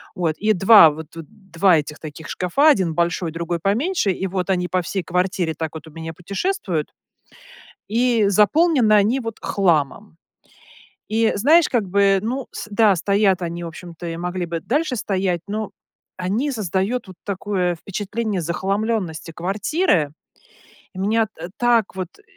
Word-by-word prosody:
Вот, 165 -4 -1
и 215 +1 +2
2 195 -4 +7
вот 155 0 -8
вот 165 -2 -8
2 190 -3 +1
этих 150 +1 -6
таких 155 0 -9
шкафа, 185 - +2
один 185 - +2
большой, 170 0 -1
другой 170 +1 -3
поменьше, 225 - +1
и 190 +1 -3
вот 185 0 -3
они 180 -1 0
по 185 0 0
всей 190 +2 -3
квартире 180 -2 -1
так 160 -1 -3
вот 160 0 -9
у - - -12
меня 160 +1 -7
путешествуют. 185 - -3 1.0
И 230 -1 +2
заполнены 235 - +3
они, 210 +6 +3
вот, 225 -2 -6
хламом. 170 0 0 0.9
И, 225 +1 +2
знаешь, 305 +9 +4
как 225 -6 0
бы, 195 0 +3
ну 255 +3 -3
с - - -7
да, 210 -2 +4
стоят 200 +1 +2
они 170 0 -4
в - - -4
общем-то, 170 0 -9
и 165 - -4
могли 180 +1 -3
бы 165 -1 -4
дальше 290 - -1
стоять, 185 -5 -1
ну, 215 0 -4 0.5
они 200 +10 -1
создают 210 +2 -2
вот 185 - -12
такое 190 -3 -1
впечатление 205 +2 -3
захламленности 190 -1 -2
квартиры. 190 - 0 0.8
И - - -9
меня, 220 +2 +1
э, 170 +2 -6
так 235 -5 +2
вот, 185 -2 -3
э - - -22
190 Hz, 160 wpm, -21 LUFS, 170-220 Hz, 1.0 s, 2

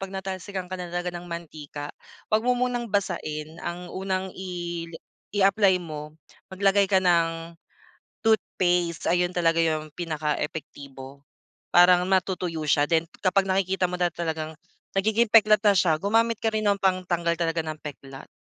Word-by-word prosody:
'pag 195 - -5
natalsikan 190 -1 -5
ka - - -1
na 175 - -5
talaga 175 0 -3
ng 175 - -12
mantika, 150 -3 -7 0.4
wag 215 - +4
mo 250 +2 +1
munang 245 -1 -1
basain. 155 -5 -3
Ang 175 +1 -6
unang 190 0 -3
i 175 -2 -5 0.5
i-apply 195 -1 +4
mo, 150 -1 -8 0.3
maglagay 195 +1 +2
ka 195 - +3
ng 170 -2 +1 0.7
toothpaste. 180 -7 +1
Ayun 180 +1 +1
talaga 165 -2 +2
yung 155 -2 +1
pinakaepektibo. 145 -4 -5 0.5
Parang 180 0 +6
matutuyo 185 -3 0
siya 145 0 +4
then 165 -1 +2 0.2
kapag 195 +1 +3
nakikita 190 -1 +1
mo 180 - -3
na 175 - +3
talagang 160 -2 -3 0.4
nagiging 220 +4 +2
peklat 215 -1 +6
na 205 -1 +4
siya, 160 -4 +3
gumamit 225 +3 +2
ka - - -1
rin 215 -1 0
ng 200 -1 +2
pangtanggal 180 -3 +1
talaga 165 0 -1
ng 155 - -3
peklat. 135 -2 -9
180 Hz, 145 wpm, -25 LUFS, 165-195 Hz, 0.7 s, Parang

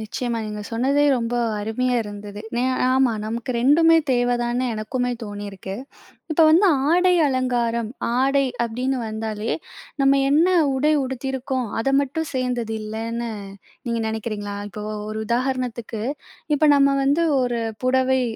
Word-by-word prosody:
நிச்சயமா. 235 +2 -3
நீங்க 210 0 -5
சொன்னதே 270 +5 +2
ரொம்ப 235 0 -2 0.3
அருமையா 245 +4 0
இருந்தது. 205 0 -8 0.2
நெ 245 - +1 0.3
ஆமா 260 -2 +3
நமக்கு 230 +3 -4
2மே 325 +5 +5
தேவைதான்னு 245 0 +1
எனக்குமே 245 +4 -2
தோணியிருக்கு. 205 -2 -6 0.6
இப்போ 320 +1 +4
வந்து 350 +6 +5 0.2
ஆடை 360 +1 +4
அலங்காரம், 240 -4 0 0.3
ஆடை 275 +1 +3 0.2
அப்டின்னு 250 +3 -2
வந்தாலே. 220 0 -3 0.5
நம்ம 275 0 +4
என்ன 315 +5 +4 0.3
உடை 300 +4 +2
உடுத்தியிருக்கோம் 265 -1 -3
அத 250 - 0
மட்டும் 285 +3 -3
சேர்ந்தது 245 -3 -1
இல்லன்னு 230 +2 -4 0.6
நீங்க 235 -1 -1
நினைக்கிறீங்களா? 210 -2 -4
இப்போ, 210 +1 -8 0.3
ஒரு 215 0 -4
உதாரணத்துக்கு 240 -2 -2 0.5
இப்ப 305 +1 +3
நம்ம 275 0 +4
வந்து 290 +5 +2 0.2
ஒரு 240 -2 0 0.2
புடவை 260 0 +2
245 Hz, 125 wpm, -22 LUFS, 220-265 Hz, 0.6 s, 2மே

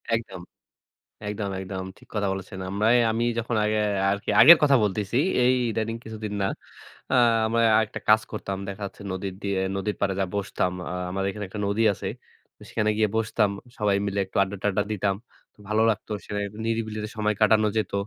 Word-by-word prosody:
একদম। 95 -6 -5 0.9
একদম, 105 -1 -3
একদম, 95 0 -5
ঠিক - - -19
কথা 100 -1 0
বলেছেন। 95 0 -7
আমরায়, 110 +4 +3
আমি 115 +1 0 0.2
যখন 115 0 -2
আগে 110 0 +1 0.3
আরকি 100 0 -3
আগের 160 +8 +11
কথা 140 -2 +5
বলতেছি, 105 +3 -1 0.3
এই 125 +1 +5 0.2
ইদানিং 110 +1 -2
কিছুদিন 110 -1 -6
না। 95 - +2 0.7
আ - - +4 0.3
আমরা 115 +1 +1 0.3
একটা - - -7
কাজ 110 0 +7
করতাম। 100 -3 -4
দেখা 100 +1 -6
যাচ্ছে 100 - -11
নদীর 95 0 -4
দিয়ে, 100 -1 -1 0.2
নদীর 100 +2 -2
পাড়ে 95 -1 +1
যায়ে 95 -2 -1
বসতাম। 95 -2 -1 0.2
আ - - -3 0.2
আমাদের 95 +1 -1
এখানে 105 +1 -6
একটা 105 +2 -6
নদী 100 +3 +1
আছে। - - -5 0.6
সেখানে 110 -1 +1
গিয়ে 110 0 +2
বসতাম। 110 -2 +1 0.3
সবাই 105 -2 +2
মিলে 100 0 -2
একটু 95 - -11
আড্ডা-টাড্ডা 100 +1 -1
দিতাম। 100 -1 0 0.5
ভালো 110 +1 +2
লাগতো, 110 0 -4
সেখানে 105 0 -3 0.2
নিরিবিলিতে 110 -2 -2
সময় 105 -1 +1
কাটানো 110 0 +4
যেত। 110 - -1
105 Hz, 175 wpm, -25 LUFS, 100-110 Hz, 0.9 s, আগের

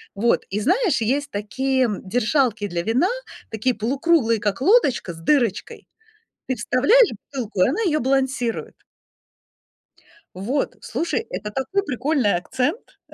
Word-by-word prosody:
Вот, 230 +4 +1
и 205 +2 -2
знаешь, 365 - +2
есть 280 +6 0
такие 260 +4 0 0.2
держалки 230 0 +1
для 170 -2 -3
вина, 250 - +2 0.4
такие 225 +3 0
полукруглые, 240 0 +1
как 205 +1 -2
лодочка 280 - +3
с - - -13
дырочкой. 290 - 0 0.6
Ты 260 - +1
вставляешь 280 - +4 0.2
бутылку, 230 -8 -3
и - - +3
она 365 +11 -1
её 305 -5 +1
балансирует. 260 -3 -1 1.6
Вот, 245 +10 -2
слушай, 335 - -2
это 210 +3 -5
такой 265 - -1
прикольный 260 - +1
акцент. 255 - -3
255 Hz, 125 wpm, -22 LUFS, 215-295 Hz, 1.6 s, вставляешь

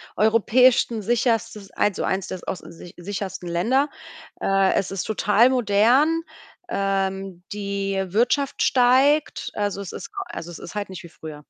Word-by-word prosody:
europäischsten 230 +1 +3
sicherstes 225 -2 -1
eins 205 -2 0
o - - 0
eins 190 0 -1
der 185 - -5
aus 185 - -4
der - - -12
sicher 170 +1 -12
sichersten 190 0 -5
Länder. 235 - +1 0.5
Äh, 195 -1 +2
es 190 - 0
ist 195 -3 -3
total 220 +2 +3
modern. 250 +7 +3 0.5
Ähm, 195 - -2
die 200 -1 -3
Wirtschaft 245 +8 +1
steigt. 265 +4 +3
Also, 205 -1 -2
es 190 - -7
ist - - -8 0.2
also, 170 - -7
es 170 - -8
ist 170 - -9
halt 205 -1 -3
nicht 185 -4 -8
wie 170 - -11
früher. 150 -2 -10
205 Hz, 155 wpm, -23 LUFS, 190-240 Hz, 0.5 s, europäischsten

